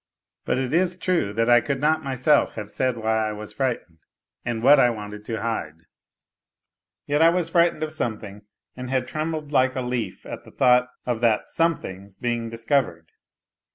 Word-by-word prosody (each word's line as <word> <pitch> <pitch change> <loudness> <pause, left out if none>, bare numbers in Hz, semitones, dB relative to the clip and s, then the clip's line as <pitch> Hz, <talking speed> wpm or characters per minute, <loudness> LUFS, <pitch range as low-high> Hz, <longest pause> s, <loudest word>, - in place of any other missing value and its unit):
But - - 0
it 130 0 -2
is 180 +1 +2
true 180 - 0
that 115 +2 +1
I 120 -1 +6
could 140 +2 -2
not 155 +2 +1
myself 135 +2 +2
havo 105 -2 -6
said 130 -2 -1
why 110 -1 0
I - - -4
was 105 0 -8
frightened 120 - -3 0.4
and 115 -1 -3
what 145 +3 +7
I 125 - +5
wanted 105 -2 -6
to 115 0 -4
hide; 85 -9 -4 1.2
yet 145 +2 +1
I 165 - +7
was 170 -1 0
frightened 170 -2 +2
of 155 0 -4
something 105 -7 -4 0.3
and 125 0 -7
had 130 -1 0
trembled 155 -1 -4
like 130 -2 +3
a 130 - -1
leaf 125 -6 -4
at - - -7
the - - -15
thought 125 -1 +4 0.2
of 120 -2 -2
that 115 -3 +2
something's 100 - -2
being 120 0 -2
discovered. 115 - -1
125 Hz, 180 wpm, -24 LUFS, 110-145 Hz, 1.2 s, what